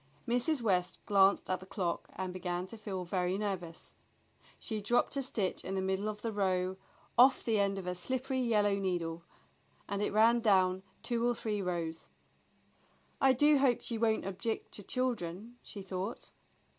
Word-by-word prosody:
Mrs. 245 Hz, +3 st, +1 dB
West 180 Hz, -4 st, +1 dB
glanced 195 Hz, -1 st, +4 dB
at 185 Hz, -1 st, -1 dB
the 185 Hz, -, -11 dB
clock 180 Hz, -3 st, -3 dB
and 185 Hz, -1 st, -4 dB
began 180 Hz, -1 st, -3 dB
to 210 Hz, -, -10 dB
feel 195 Hz, -4 st, -5 dB
very 180 Hz, +1 st, 0 dB
nervous. 185 Hz, -5 st, -4 dB, 0.7 s
She 220 Hz, -3 st, -4 dB
dropped 240 Hz, +7 st, +2 dB
a 275 Hz, -, 0 dB
stitch 220 Hz, -7 st, -1 dB
in 190 Hz, -, -3 dB
the 190 Hz, -, 0 dB
middle 190 Hz, +2 st, -1 dB
of 210 Hz, 0 st, -7 dB
the 230 Hz, -, -1 dB
row, 185 Hz, -2 st, 0 dB, 0.4 s
off 260 Hz, +2 st, +7 dB
the 220 Hz, -3 st, +1 dB
end 200 Hz, 0 st, +1 dB
of 190 Hz, -, -5 dB
her 180 Hz, -, -1 dB
slippery 260 Hz, +7 st, -2 dB
yellow 210 Hz, -5 st, +2 dB
needle, 170 Hz, -3 st, -2 dB, 0.7 s
and 200 Hz, 0 st, -2 dB
it 210 Hz, -, 0 dB
ran 225 Hz, +3 st, +5 dB
down 190 Hz, -4 st, +3 dB, 0.2 s
two 235 Hz, -1 st, 0 dB
or 240 Hz, -, 0 dB
three 210 Hz, -3 st, -2 dB
rows. 170 Hz, -3 st, -3 dB, 1.1 s
"I 265 Hz, -1 st, +6 dB
do 295 Hz, +2 st, +5 dB
hope 260 Hz, -3 st, +3 dB
she 230 Hz, -2 st, -2 dB
won't 220 Hz, -3 st, +1 dB
object 195 Hz, +4 st, -3 dB
to -, -, -5 dB
children," 230 Hz, -1 st, -3 dB
she 200 Hz, -, -8 dB
thought. 190 Hz, +4 st, -5 dB
200 Hz, 170 wpm, -32 LUFS, 185-230 Hz, 1.1 s, off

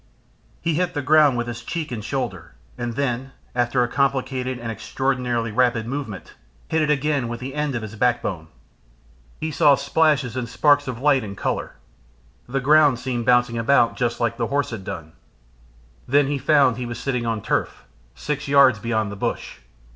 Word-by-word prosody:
He 165 Hz, -, 0 dB
hit 180 Hz, +2 st, -1 dB
the 145 Hz, -, -2 dB
ground 145 Hz, -2 st, +5 dB
with 120 Hz, -, -1 dB
his 120 Hz, -1 st, -6 dB
cheek 155 Hz, +4 st, -4 dB
and 110 Hz, -3 st, -4 dB
shoulder, 135 Hz, +4 st, -4 dB, 0.2 s
and 120 Hz, -1 st, -4 dB
then, 135 Hz, 0 st, -2 dB, 0.2 s
after 120 Hz, +1 st, +1 dB
a -, -, 0 dB
complicated 130 Hz, -1 st, -1 dB
and 120 Hz, -1 st, -5 dB
extraordinarily 120 Hz, 0 st, -2 dB
rapid 120 Hz, -1 st, +2 dB
movement, 120 Hz, -, -6 dB, 0.4 s
hit 160 Hz, 0 st, +1 dB
it 150 Hz, -, +1 dB
again 145 Hz, -3 st, +1 dB
with 120 Hz, 0 st, -5 dB
the 130 Hz, +2 st, -6 dB
end 150 Hz, -2 st, -2 dB
of 115 Hz, -, -3 dB
his 110 Hz, 0 st, -7 dB
backbone. 110 Hz, -8 st, -1 dB, 0.9 s
He 160 Hz, -, -3 dB
saw 145 Hz, -1 st, +5 dB
splashes 145 Hz, -6 st, +1 dB
and 125 Hz, -2 st, -3 dB
sparks 145 Hz, +2 st, +3 dB
of 125 Hz, -2 st, -4 dB
light 135 Hz, -2 st, +3 dB
and 100 Hz, -2 st, -7 dB
colour. -, -, -3 dB, 0.7 s
The 135 Hz, +2 st, 0 dB
ground 145 Hz, 0 st, +5 dB
seemed 120 Hz, -2 st, -3 dB
bouncing 120 Hz, -1 st, +3 dB
about 120 Hz, 0 st, +3 dB
just 120 Hz, -2 st, -1 dB
like 115 Hz, -1 st, 0 dB
the 115 Hz, -, -1 dB
horse 140 Hz, -2 st, -1 dB
had 110 Hz, -4 st, -6 dB
done. 80 Hz, -3 st, -7 dB, 1.0 s
Then 140 Hz, +2 st, +4 dB
he 140 Hz, 0 st, -2 dB
found 135 Hz, -3 st, +3 dB
he 125 Hz, -1 st, -4 dB
was 120 Hz, -, -5 dB
sitting 125 Hz, -4 st, -2 dB
on 110 Hz, -3 st, -2 dB
turf, -, -, -2 dB, 0.3 s
six 150 Hz, 0 st, -4 dB
yards 140 Hz, -6 st, +5 dB
beyond 110 Hz, -2 st, -1 dB
the -, -, -6 dB
bush. 95 Hz, -, -4 dB
125 Hz, 180 wpm, -22 LUFS, 115-140 Hz, 1.0 s, ground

